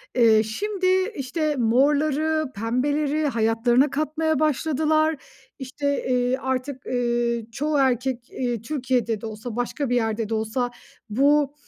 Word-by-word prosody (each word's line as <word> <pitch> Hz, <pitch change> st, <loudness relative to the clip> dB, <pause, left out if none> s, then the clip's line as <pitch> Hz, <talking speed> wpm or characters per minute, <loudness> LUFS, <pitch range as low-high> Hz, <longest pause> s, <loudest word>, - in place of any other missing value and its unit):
eee, 225 Hz, -3 st, +5 dB
şimdi, 375 Hz, -, -2 dB, 0.3 s
işte, 295 Hz, +3 st, -1 dB
morları, 290 Hz, +5 st, +2 dB
pembeleri 285 Hz, +7 st, 0 dB
hayatlarına 235 Hz, +2 st, +2 dB
katmaya 310 Hz, +2 st, -1 dB
başladılar. 310 Hz, +1 st, +1 dB, 0.4 s
İşte, 285 Hz, +2 st, -2 dB
eee, 250 Hz, +1 st, +1 dB
artık, 260 Hz, 0 st, -3 dB
eee, 240 Hz, -2 st, 0 dB
çoğu 295 Hz, +5 st, -1 dB
erkek, 255 Hz, -2 st, 0 dB
eee, 240 Hz, -4 st, -3 dB
Türkiye'de 245 Hz, -5 st, -1 dB
de -, -, -6 dB
olsa 220 Hz, +1 st, -6 dB
başka 245 Hz, +3 st, -2 dB
bir 245 Hz, -, +1 dB
yerde 225 Hz, -2 st, -1 dB
de -, -, -2 dB
olsa 220 Hz, +3 st, -1 dB, 0.4 s
bu 285 Hz, +4 st, +3 dB
260 Hz, 125 wpm, -24 LUFS, 235-295 Hz, 0.4 s, eee